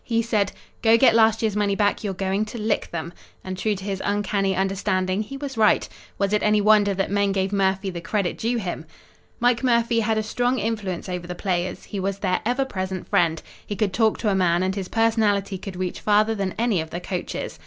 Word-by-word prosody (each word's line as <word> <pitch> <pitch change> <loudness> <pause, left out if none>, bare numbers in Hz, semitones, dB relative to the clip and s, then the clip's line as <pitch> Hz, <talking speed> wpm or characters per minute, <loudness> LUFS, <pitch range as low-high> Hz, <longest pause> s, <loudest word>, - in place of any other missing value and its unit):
He 230 -1 0
said, 210 -4 +1 0.3
"Go 225 0 +5
get 235 -1 +5
last 225 0 +4
year's 215 -2 0
money 205 -1 +1
back, 205 +1 +1
you're 195 -3 -2
going 195 +2 0
to 215 - -8
lick 215 -1 -1
them!" 170 0 -5 0.3
And 185 0 -5
true 210 +3 0
to 190 - -8
his 195 -1 -3
uncanny 200 -1 0
understanding 190 0 0
he 270 +6 -6
was 270 -4 -6
right. 215 - +4 0.3
Was 200 +1 0
it 210 - +2
any 210 0 +3
wonder 205 -1 +4
that 195 0 -1
men 200 0 +2
gave 195 0 -1
Murphy 195 0 +1
the 170 -1 -6
credit 195 0 -1
due 235 +2 -1
him? 175 -6 -4 0.5
Mike 240 0 +2
Murphy 235 -2 +2
had 220 0 +1
a 215 - 0
strong 245 +4 0
influence 205 -5 -3
over 180 -1 -4
the 180 - -5
players. 180 -1 -2
He 200 - -6
was 195 +1 -2
their 185 -2 0
ever 260 +3 +1
present 190 -6 -4
friend. 165 -2 +2 0.2
He 205 - -5
could 200 -2 0
talk 220 0 +2
to 220 - 0
a - - +2
man, 175 -1 +2
and 190 0 0
his 195 -2 -4
personality 210 -4 +1
could 195 -1 -7
reach 180 0 -3
farther 215 +1 +3
than 195 -3 -3
any 225 -6 +1
of 160 - -7
the 175 - -4
coaches. 180 0 -5
200 Hz, 225 wpm, -23 LUFS, 190-220 Hz, 0.5 s, Go